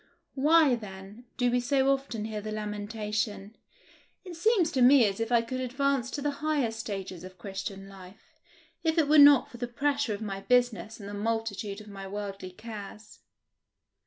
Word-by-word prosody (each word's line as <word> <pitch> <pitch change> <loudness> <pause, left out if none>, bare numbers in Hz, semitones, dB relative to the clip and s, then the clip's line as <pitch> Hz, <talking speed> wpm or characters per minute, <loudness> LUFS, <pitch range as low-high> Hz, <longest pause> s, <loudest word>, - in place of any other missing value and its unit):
Why, 300 0 +4
then, 205 0 -7
do 245 -1 +2
we 245 - +2
so 270 +2 +2
often 255 -6 -4
hear 215 -1 -4
the 215 +1 -6
lamentation, 210 0 -4 0.7
"It 360 -2 -8
seems 360 -2 +2
to 265 - 0
me 255 0 +7
as 195 0 -1
if 225 +1 -2
I 235 -1 +4
could 255 +2 -4
advance 260 0 0
to 285 - -5
the 290 - +1
higher 300 -7 +1
stages 195 -5 -6
of 185 0 -11
Christian 195 +1 -6
life, 195 - -14 0.5
if 320 0 +1
it 315 -3 +3
were 300 +1 +6
not 285 -2 +7
for 240 - -10
the 245 0 -3
pressure 280 -1 0
of 200 - -10
my 195 -2 -4
business 230 -3 +1
and 200 - -9
the 205 - -7
multitude 215 -1 -3
of 215 - -14
my 195 -1 -8
worldly 200 -1 -6
cares"? 210 +1 -10
225 Hz, 180 wpm, -28 LUFS, 205-270 Hz, 0.7 s, me